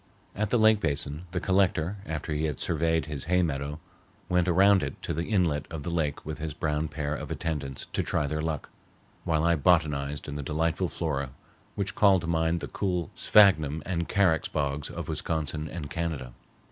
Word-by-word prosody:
At 105 Hz, 0 st, -1 dB
the 120 Hz, -, +3 dB
lake 110 Hz, -1 st, +5 dB
basin 75 Hz, +1 st, -1 dB
the 90 Hz, +1 st, -2 dB
Collector, 95 Hz, -1 st, +1 dB
after 80 Hz, 0 st, -3 dB
he 75 Hz, +1 st, 0 dB
had 75 Hz, -3 st, -2 dB
surveyed 80 Hz, 0 st, +1 dB
his 75 Hz, -3 st, -5 dB
hay 90 Hz, +1 st, +3 dB
meadow, 75 Hz, -1 st, -2 dB, 0.5 s
went 90 Hz, 0 st, +2 dB
around 95 Hz, +2 st, +5 dB
it -, -, -4 dB
to -, -, -2 dB
the 85 Hz, +3 st, -2 dB
inlet 85 Hz, -9 st, +1 dB
of 80 Hz, -3 st, -6 dB
the 85 Hz, -, -3 dB
lake 80 Hz, -4 st, -1 dB
with 75 Hz, 0 st, -5 dB
his 75 Hz, -2 st, -4 dB
brown 75 Hz, 0 st, -1 dB
pair 75 Hz, 0 st, -3 dB
of -, -, -5 dB
attendants 70 Hz, -5 st, -3 dB
to -, -, +1 dB
try 75 Hz, -, 0 dB
their 75 Hz, +2 st, -2 dB
luck, 80 Hz, -2 st, -3 dB, 0.5 s
while 80 Hz, -2 st, +1 dB
I 85 Hz, 0 st, +4 dB
botanized 75 Hz, -3 st, +1 dB
in 75 Hz, -, -5 dB
the 75 Hz, -, -4 dB
delightful 80 Hz, +5 st, 0 dB
flora 70 Hz, -5 st, -2 dB, 0.5 s
which 100 Hz, -1 st, -2 dB
called 95 Hz, -3 st, +5 dB
to 85 Hz, -, -5 dB
mind 80 Hz, 0 st, +1 dB
the -, -, -4 dB
cool 90 Hz, -5 st, -2 dB
sphagnum 80 Hz, -8 st, +4 dB
and 85 Hz, -2 st, -2 dB
carex 95 Hz, -6 st, +3 dB
bogs 70 Hz, -1 st, -1 dB
of -, -, -6 dB
Wisconsin 75 Hz, -1 st, -2 dB
and 80 Hz, -3 st, -5 dB
Canada. 80 Hz, -7 st, -3 dB
80 Hz, 190 wpm, -28 LUFS, 75-90 Hz, 0.5 s, lake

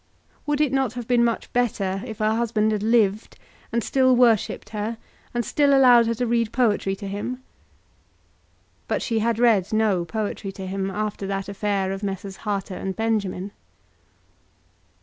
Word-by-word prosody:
Would 295 Hz, 0 st, +1 dB
it 295 Hz, -3 st, +1 dB
not 265 Hz, -4 st, +1 dB
have 245 Hz, -2 st, -6 dB
been 245 Hz, -1 st, +3 dB
much 235 Hz, -1 st, -1 dB
better 200 Hz, -6 st, 0 dB
if 220 Hz, -3 st, -7 dB
her 215 Hz, 0 st, +1 dB
husband 220 Hz, -2 st, +1 dB
had 210 Hz, -2 st, -1 dB
lived, 215 Hz, -2 st, +1 dB, 0.3 s
and 235 Hz, -1 st, 0 dB
still 260 Hz, -1 st, +3 dB
worshipped 235 Hz, -4 st, +2 dB
her, 215 Hz, +2 st, -4 dB, 0.3 s
and 240 Hz, -1 st, -2 dB
still 285 Hz, -2 st, +3 dB
allowed 245 Hz, -3 st, +6 dB
her 230 Hz, -, 0 dB
to 245 Hz, +2 st, -1 dB
read 230 Hz, -1 st, 0 dB
poetry 210 Hz, -6 st, +1 dB
to 200 Hz, 0 st, -7 dB
him? 245 Hz, +6 st, -5 dB, 1.4 s
But -, -, -1 dB
she 225 Hz, -2 st, 0 dB
had 230 Hz, 0 st, 0 dB
read 225 Hz, -6 st, +3 dB
no 215 Hz, -5 st, +2 dB
poetry 205 Hz, 0 st, -4 dB
to 190 Hz, 0 st, -7 dB
him 190 Hz, +1 st, -3 dB
after 205 Hz, 0 st, -3 dB
that 195 Hz, 0 st, -3 dB
affair 200 Hz, -1 st, -1 dB
of 195 Hz, 0 st, -4 dB
Messrs. 195 Hz, -1 st, -5 dB
Harter 200 Hz, -2 st, -3 dB
and 190 Hz, +1 st, -4 dB
Benjamin. 205 Hz, -4 st, -1 dB
215 Hz, 165 wpm, -23 LUFS, 195-235 Hz, 1.4 s, allowed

